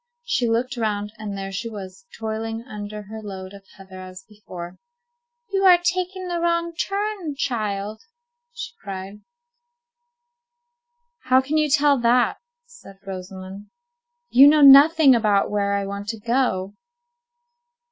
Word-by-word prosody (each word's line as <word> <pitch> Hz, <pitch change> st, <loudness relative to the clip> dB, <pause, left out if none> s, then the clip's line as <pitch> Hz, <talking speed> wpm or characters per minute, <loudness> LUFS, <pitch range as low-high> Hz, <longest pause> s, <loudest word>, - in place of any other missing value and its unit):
She 245 Hz, -, 0 dB
looked 245 Hz, +3 st, -1 dB
round, 210 Hz, -2 st, -2 dB
and 205 Hz, -2 st, -6 dB
there 195 Hz, 0 st, -5 dB
she 230 Hz, +5 st, -4 dB
was, 200 Hz, +7 st, -10 dB
toiling 225 Hz, +1 st, -4 dB
under 210 Hz, -3 st, -8 dB
her 220 Hz, +2 st, -9 dB
load 190 Hz, -2 st, -8 dB
of 200 Hz, -1 st, -14 dB
heather 190 Hz, -1 st, -12 dB
as 185 Hz, 0 st, -11 dB
before. 185 Hz, -5 st, -10 dB, 0.7 s
"You 390 Hz, 0 st, 0 dB
are 360 Hz, -2 st, +8 dB
taking 365 Hz, +1 st, -2 dB
the 345 Hz, -1 st, -2 dB
wrong 340 Hz, 0 st, 0 dB
turn, 390 Hz, -3 st, -3 dB
child." 215 Hz, -5 st, -3 dB, 0.5 s
she 485 Hz, +1 st, -7 dB
cried. 195 Hz, +1 st, -8 dB, 2.0 s
"How 255 Hz, 0 st, +5 dB
can 280 Hz, +4 st, -1 dB
you 305 Hz, -1 st, +1 dB
tell 285 Hz, -1 st, +3 dB
that?" 240 Hz, +1 st, +2 dB, 0.3 s
said 480 Hz, -, -16 dB
Rosamond. 190 Hz, +1 st, -9 dB, 0.6 s
"You 270 Hz, +3 st, +8 dB
know 300 Hz, +1 st, +5 dB
nothing 285 Hz, +1 st, +8 dB
about 210 Hz, -4 st, +2 dB
where 200 Hz, -1 st, 0 dB
I 200 Hz, 0 st, -2 dB
want 200 Hz, +1 st, -6 dB
to 225 Hz, 0 st, -4 dB
go." 230 Hz, -5 st, -1 dB
220 Hz, 135 wpm, -22 LUFS, 200-290 Hz, 2.0 s, are